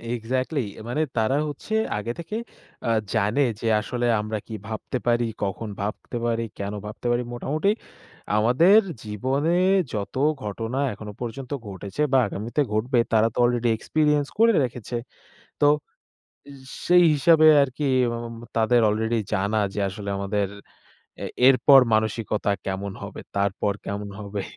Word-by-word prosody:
Exactly 130 +5 -1 0.2
এ - - -9
মানে 150 +6 0 0.2
তারা 115 +5 +2
হচ্ছে 150 +9 -6 0.2
আগে 115 +3 -3
থেকে 210 +6 -5 0.5
আ - - +1 0.2
জানে 110 +8 +2 0.2
যে 115 - -1
আসলে 120 +1 -3 0.2
আমরা 110 0 -3
কী 110 - -6
ভাবতে 110 +3 -4
পারি? 120 0 +3 0.2
কখন 105 +2 -3
ভাবতে 105 +4 -4
পারি? 115 -1 0 0.2
কেন 100 +1 -3
ভাবতে 110 +3 -6
পারি? 120 +1 +1
মোটামুটি 155 +10 -1 0.7
আমাদের 150 - +6 0.2
জীবনে 130 +10 -1 0.4
যত 100 -2 -4 0.3
ঘটনা 115 +5 -3
এখনো 105 0 -8
পর্যন্ত 125 +2 -6 0.2
ঘটেছে 100 +6 -6
বা - - +6
আগামীতে 110 +9 -2
ঘটবে 120 +3 +1
তারা 110 0 +5
তো - - -12
আলরেডি 120 -1 +2
এক্সপেরিয়েন্স 150 +2 +1
করে 230 +1 +6
রেখেছে। 120 -1 -5 0.7
তো 145 - +5 0.8
এজ 140 -1 -11 0.3
সেই 175 0 +6
হিসাবে 155 +2 +5 0.2
আরকি 140 +2 -2 0.3
ম - - -3 0.2
ম - - -10 0.2
তাদের 115 +2 +4
আলরেডি 110 +2 0
জানা 105 +2 +1 0.2
যে 105 - -2
আসলে 100 +1 -7
আমাদের 100 0 -1 0.8
এ - - -3 0.2
এরপর 135 +1 +7
মানসিকতা 110 -1 0 0.2
কেমন 95 +1 -3
হবে, - - -7 0.2
তারপর 100 +1 0
কেমন 100 0 -4
হবে। 100 -1 -4
115 Hz, 145 wpm, -24 LUFS, 105-135 Hz, 0.8 s, এরপর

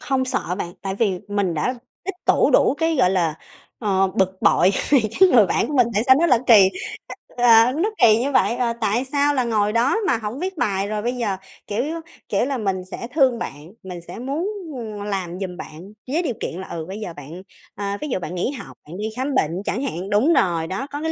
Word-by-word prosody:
không 265 -1 0
sợ 250 - -2
bạn, 175 -3 -4
tại 195 -1 -3
vì 200 -3 0
mình 200 -4 0
đã 250 +12 -1 0.3
tích 390 0 -4
tụ - - +4
đủ - - +4
cái, 325 0 +1
gọi 185 -8 +4
là, 170 -5 +1 0.4
ờ, 195 -3 +1
bực 190 0 0
bội 185 - +5 0.2
vì 280 -3 +6 0.2
cái 380 - +8
người 220 - +6
bạn - - 0
của 295 - -4
mình 250 -3 +5
tại 210 - +2
sao 260 - +7
nó 340 - +4
lại 250 -7 +4
kỳ 205 -5 +8 0.7
á, 230 -2 +7
ờ, 250 - +1
nó 335 +10 0
kỳ 220 -2 +7
như 270 +4 -1
vậy? 240 - +2
Ờ, 240 -2 0
tại 220 +5 +1
sao 290 0 +2
là 260 -3 +1
ngồi 210 -3 +1
đó 235 - +2
mà 235 - +2
hổng 220 +4 -5
viết 375 +1 -4
bài 200 -6 0
rồi 210 0 -2
bây 240 +3 -1
giờ, 215 -6 -2 0.3
kiểu, 210 +4 -1 0.5
kiểu 205 +4 +1
là, 275 -1 -2
mình 190 -5 -2
sẽ 235 - -6
thương 260 -6 +3
bạn, 150 +6 -7
mình 180 -2 -7
sẽ - - -8
muốn, 280 +9 -2 0.3
ừm, 215 -3 -6
làm 185 -3 -3
giùm 185 -2 -5
bạn 175 +6 -10
với 310 +7 0
điều 285 - -1
kiện 175 - -4
là, 190 - -8
ừ, 160 -2 -5
bây 195 +3 -6
giờ 180 -6 -6
bạn 150 +5 -10 0.3
ờ, 200 0 -3
ví 300 - -3
dụ 215 - -1
bạn 175 0 -6
nghỉ 180 +9 -1
học, 265 - -10
bạn 170 - -8
đi 210 - -3
khám 265 +2 -2
bệnh 155 - +2
chẳng 245 - -2
hạn 195 -7 -4
đúng 235 +11 +3
rồi 170 - +1
đó, 195 +11 -4
có 290 +1 -5
cái 320 - -1
215 Hz, 240 wpm, -22 LUFS, 190-260 Hz, 0.7 s, cái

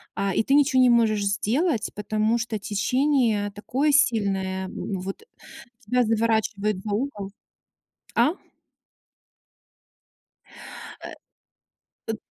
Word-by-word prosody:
А, 195 -1 -1
и - - +1
ты 275 - +2
ниче 270 -3 +4
не 250 -1 +6
можешь 220 -3 +3
сделать, 225 - 0
потому 215 +2 0
что 220 -1 -3
течение 215 0 +1
такое 260 +8 -1
сильное, 195 -8 +1
вот 195 - -5 0.6
тебя 250 -2 +1
заворачивает 220 -2 0
за 210 - -4
угол. 205 -4 -3 0.8
А? 320 +5 +3 2.7
Э, - - -8 1.0
ы 220 - -4
220 Hz, 100 wpm, -24 LUFS, 205-250 Hz, 2.7 s, не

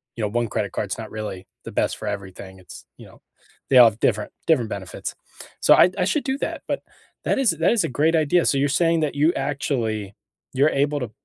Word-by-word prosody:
you 115 - -4
know, - - +1
one 120 +2 -1
credit 105 -1 -2
card's 100 -2 -3
not 110 -1 -8
really 105 -3 -6 0.2
the - - -8
best - - -1
for 110 - -7
everything. 95 -1 -7
It's, 90 - -13
you - - -13
know - - -19 0.5
they 130 - +5
all 120 -2 +9
have 110 - -14
different 105 -3 0 0.2
different 130 -9 +2
benefits. 95 -3 -6 0.5
So - - +6
I 180 - +6
I 180 - +1
should 290 +9 0
do 265 0 -1
that, - - -4
but - - -3 0.4
that - - +1
is 265 -5 +3
that 165 +4 +1
is 230 - +2
a - - -2
great 155 +5 +1
idea. 160 +2 +2
So, 140 - +2
you're 140 +1 +1
saying 165 +3 +2
that 150 -2 -1
you 155 +4 +3
actually 120 -7 -2 0.4
you're 140 +3 +3
able 145 +1 0
to 120 -4 -5
130 Hz, 230 wpm, -23 LUFS, 105-155 Hz, 0.5 s, all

